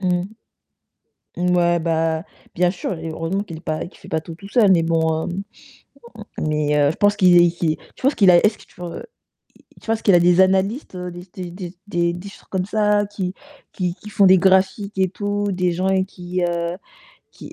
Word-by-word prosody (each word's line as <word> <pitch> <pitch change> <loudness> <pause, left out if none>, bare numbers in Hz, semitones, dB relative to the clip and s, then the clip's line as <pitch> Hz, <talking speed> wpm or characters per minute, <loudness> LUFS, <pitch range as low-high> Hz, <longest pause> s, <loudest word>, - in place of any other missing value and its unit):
mmh. 180 -2 0 1.1
Ouais, 175 -1 +2
bah, 160 -1 0 0.3
bien 180 0 +2
sûr, 185 +1 -4
et 165 0 -5
heureusement 165 +5 -2
qu'il 170 -6 -8
est - - -10
pas 165 +1 -4
qu'il - - -17
fait 190 - -15
pas 160 -4 -1
tout 165 0 -9
tout 195 +3 -12
seul, 205 -3 +4
mais 170 -3 +4
bon, 160 -1 0
heu, - - -3 1.1
mais 150 -1 0
heu, 145 -1 +3
je - - -5
pense 205 0 +3
qu'il 180 -3 +5
est 175 - +6 0.5
je - - -17
pense 270 +2 +3
qu'il 195 -4 +5
a 175 - +7
est-ce 210 0 +2
que - - -16
tu - - -25 1.1
tu - - -18
penses 225 0 -1
qu'il 200 - +4
a 175 - +6
des 175 +1 +4
analystes, 190 +4 0
des 180 -1 -6
des 180 -2 -6
des 180 0 -8
des 170 -2 0
des 175 +3 -8
choses - - -16
comme 185 -1 -1
ça 210 0 +2
qui 190 -3 -4 0.4
qui 180 -3 -2
qui 210 +2 -12
font 200 -1 +4
des 190 - +7
graphiques 190 +2 +2
et 190 - +3
tout, 205 0 -2
des 180 -1 0
gens 180 +2 -2
avec 190 0 +1
qui, 180 -1 -5
heu, 170 0 -2 0.6
qui - - -12
180 Hz, 205 wpm, -21 LUFS, 170-195 Hz, 1.1 s, a